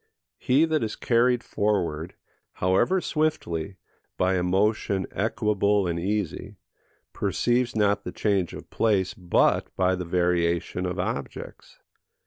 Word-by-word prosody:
He 140 Hz, +6 st, +3 dB
that 160 Hz, -4 st, 0 dB
is 110 Hz, -, -3 dB
carried 120 Hz, 0 st, +2 dB
forward, 90 Hz, -6 st, -1 dB, 0.4 s
however 95 Hz, -, +2 dB
swiftly, 100 Hz, -, -1 dB, 0.4 s
by 95 Hz, +1 st, +2 dB
a 90 Hz, -, +1 dB
motion 95 Hz, +1 st, +1 dB
equable 105 Hz, -1 st, +1 dB
and 85 Hz, -1 st, -1 dB
easy, 100 Hz, +1 st, -3 dB, 0.6 s
perceives 120 Hz, 0 st, 0 dB
not 100 Hz, -1 st, +2 dB
the -, -, -5 dB
change 100 Hz, -5 st, 0 dB
of -, -, -11 dB
place 100 Hz, -5 st, +1 dB
but 90 Hz, -2 st, +2 dB
by 95 Hz, 0 st, +2 dB
the 90 Hz, -1 st, -3 dB
variation 85 Hz, 0 st, 0 dB
of 90 Hz, +1 st, -4 dB
objects. 90 Hz, -, -5 dB
100 Hz, 120 wpm, -25 LUFS, 90-110 Hz, 0.6 s, He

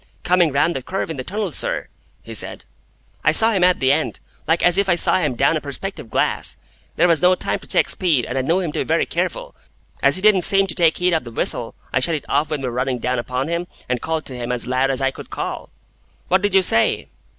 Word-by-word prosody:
"Coming 175 Hz, -3 st, +3 dB
round 145 Hz, +5 st, +1 dB
the 135 Hz, -, -3 dB
curve 185 Hz, +4 st, -4 dB
in 160 Hz, -, -6 dB
the 130 Hz, -, -4 dB
tunnel, 210 Hz, +8 st, -3 dB
sir," -, -, -2 dB, 0.4 s
he -, -, -9 dB
said, -, -, -2 dB, 0.6 s
"I -, -, +4 dB
saw 225 Hz, +1 st, +5 dB
him 190 Hz, -5 st, +1 dB
at 180 Hz, 0 st, +4 dB
the 130 Hz, -1 st, +3 dB
end, 155 Hz, +2 st, -1 dB, 0.3 s
like 165 Hz, +2 st, +2 dB
as 175 Hz, +2 st, +4 dB
if 200 Hz, -1 st, +1 dB
I 175 Hz, -, +4 dB
saw 175 Hz, -, +4 dB
him 150 Hz, -8 st, -1 dB
down 140 Hz, +6 st, +2 dB
a 155 Hz, -, -1 dB
perspective 145 Hz, -, -6 dB
glass. -, -, 0 dB, 0.4 s
There -, -, +3 dB
was 165 Hz, -3 st, +3 dB
no 180 Hz, +1 st, +5 dB
time -, -, -2 dB
to -, -, -15 dB
check -, -, +2 dB
speed, 155 Hz, -, 0 dB
and 125 Hz, -, -5 dB
I 135 Hz, -, +1 dB
knew 165 Hz, +8 st, +1 dB
him 175 Hz, -5 st, -2 dB
to -, -, -4 dB
be -, -, +1 dB
very -, -, +1 dB
careful. -, -, -3 dB, 0.5 s
As -, -, +3 dB
he 185 Hz, -, 0 dB
didn't 210 Hz, -3 st, +5 dB
seem 195 Hz, +2 st, +4 dB
to 190 Hz, -, -4 dB
take 165 Hz, -2 st, +2 dB
heed 180 Hz, 0 st, +1 dB
of 160 Hz, -, +1 dB
the 120 Hz, -, -9 dB
whistle, 115 Hz, 0 st, -1 dB, 0.2 s
I 130 Hz, -, +3 dB
shut 160 Hz, +6 st, +1 dB
it 150 Hz, -, -6 dB
off 145 Hz, +2 st, +1 dB
when 150 Hz, -3 st, -3 dB
we -, -, -1 dB
were 120 Hz, -, -4 dB
running 125 Hz, +1 st, -1 dB
down 125 Hz, +1 st, -1 dB
upon 125 Hz, +3 st, -3 dB
him, 170 Hz, +1 st, -2 dB, 0.2 s
and 125 Hz, -1 st, -2 dB
called 160 Hz, -1 st, -2 dB
to 130 Hz, -, -6 dB
him 120 Hz, 0 st, -4 dB
as 125 Hz, -1 st, 0 dB
loud 130 Hz, +2 st, +1 dB
as 135 Hz, 0 st, -1 dB
I 135 Hz, 0 st, +1 dB
could -, -, -11 dB
call." -, -, -5 dB, 0.6 s
"What 185 Hz, +1 st, +3 dB
did 205 Hz, -1 st, 0 dB
you 190 Hz, -, +5 dB
say?" 115 Hz, -10 st, +2 dB
160 Hz, 260 wpm, -20 LUFS, 130-180 Hz, 0.6 s, saw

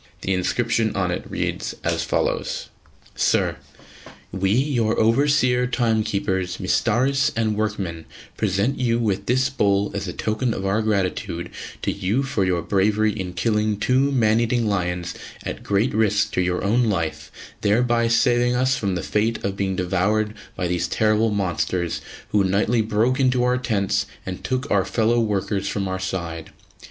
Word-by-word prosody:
The 95 Hz, -, 0 dB
inscription 115 Hz, +4 st, 0 dB
on 90 Hz, -2 st, 0 dB
it -, -, -4 dB
reads -, -, -3 dB
as -, -, 0 dB
follows: -, -, -1 dB, 0.5 s
SIR, -, -, +1 dB, 0.7 s
We, 95 Hz, 0 st, 0 dB
your 120 Hz, -1 st, +1 dB
Overseer, 125 Hz, +1 st, +3 dB
Timekeepers, 110 Hz, -6 st, 0 dB
Mistaris 135 Hz, +4 st, +2 dB
and 110 Hz, -1 st, 0 dB
Workmen, 100 Hz, -6 st, -3 dB, 0.3 s
present 105 Hz, +5 st, 0 dB
you 120 Hz, -2 st, +2 dB
with 100 Hz, -4 st, -1 dB
this 130 Hz, +1 st, +2 dB
bowl 100 Hz, -5 st, +1 dB
as -, -, -3 dB
a -, -, -4 dB
token 110 Hz, +2 st, -1 dB
of 95 Hz, -, -4 dB
our 100 Hz, +3 st, +1 dB
gratitude 95 Hz, -4 st, -1 dB, 0.3 s
to -, -, +1 dB
you 100 Hz, +7 st, 0 dB
for 130 Hz, -7 st, -1 dB
your 90 Hz, -3 st, 0 dB
bravery 105 Hz, +3 st, +2 dB
in 95 Hz, -4 st, -5 dB
killing 105 Hz, +2 st, 0 dB
two 130 Hz, +6 st, +2 dB
man 115 Hz, -4 st, +3 dB
eating 120 Hz, 0 st, +1 dB
lions 90 Hz, -4 st, -1 dB, 0.3 s
at -, -, -5 dB
great 100 Hz, +5 st, +1 dB
risk 105 Hz, -1 st, +2 dB
to 95 Hz, -, 0 dB
your 90 Hz, 0 st, -1 dB
own 115 Hz, +5 st, +2 dB
life, 85 Hz, -7 st, -2 dB, 0.3 s
thereby 115 Hz, +2 st, +2 dB
saving 120 Hz, +1 st, +3 dB
us 130 Hz, +1 st, +2 dB
from 100 Hz, -3 st, -1 dB
the 90 Hz, -, -3 dB
fate 110 Hz, +2 st, 0 dB
of 100 Hz, 0 st, -2 dB
being 95 Hz, -1 st, -1 dB
devoured 100 Hz, +4 st, 0 dB, 0.2 s
by 90 Hz, -, -2 dB
these 90 Hz, 0 st, 0 dB
terrible 110 Hz, +4 st, +2 dB
monsters 90 Hz, -3 st, -1 dB, 0.3 s
who 105 Hz, -1 st, +3 dB
nightly 105 Hz, +5 st, +2 dB
broke 115 Hz, +5 st, +1 dB
into 125 Hz, -2 st, +3 dB
our 125 Hz, 0 st, +2 dB
tents 105 Hz, -6 st, 0 dB, 0.2 s
and 95 Hz, 0 st, -6 dB
took 130 Hz, +2 st, -2 dB
our 100 Hz, -2 st, +3 dB
fellow 115 Hz, +3 st, +1 dB
workers 100 Hz, -2 st, -1 dB
from 100 Hz, -1 st, -2 dB
our 95 Hz, 0 st, -3 dB
side. 85 Hz, -3 st, -4 dB
105 Hz, 160 wpm, -22 LUFS, 95-120 Hz, 0.7 s, Overseer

